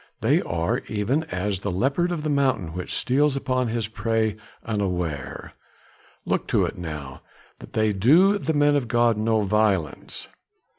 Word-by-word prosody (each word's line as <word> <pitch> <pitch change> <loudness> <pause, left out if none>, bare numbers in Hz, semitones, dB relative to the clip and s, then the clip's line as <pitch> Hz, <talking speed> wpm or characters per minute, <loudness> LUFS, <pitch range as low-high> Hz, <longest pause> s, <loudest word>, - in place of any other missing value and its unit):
They - - +3
are 85 0 -1
even 115 +9 0
as 100 - -2
the 100 - -3
leopard 135 - 0
of 165 -3 -3
the 155 - -1
mountain 130 - +1
which 90 +1 -5
steals 140 +2 +2
upon 130 -2 0
his 115 -2 -2
prey 110 -1 0 0.3
unaware. 90 - -3 0.7
Look - - -1
to - - +2
it - - -4
now 75 -6 -7 0.4
that - - -13
they 110 -1 +2
do 165 - +5
the 160 - -1
men 145 0 +4
of 135 -4 0
God 120 0 +3
no 110 +1 +1
violence!" 100 -6 0
110 Hz, 155 wpm, -24 LUFS, 95-135 Hz, 0.7 s, do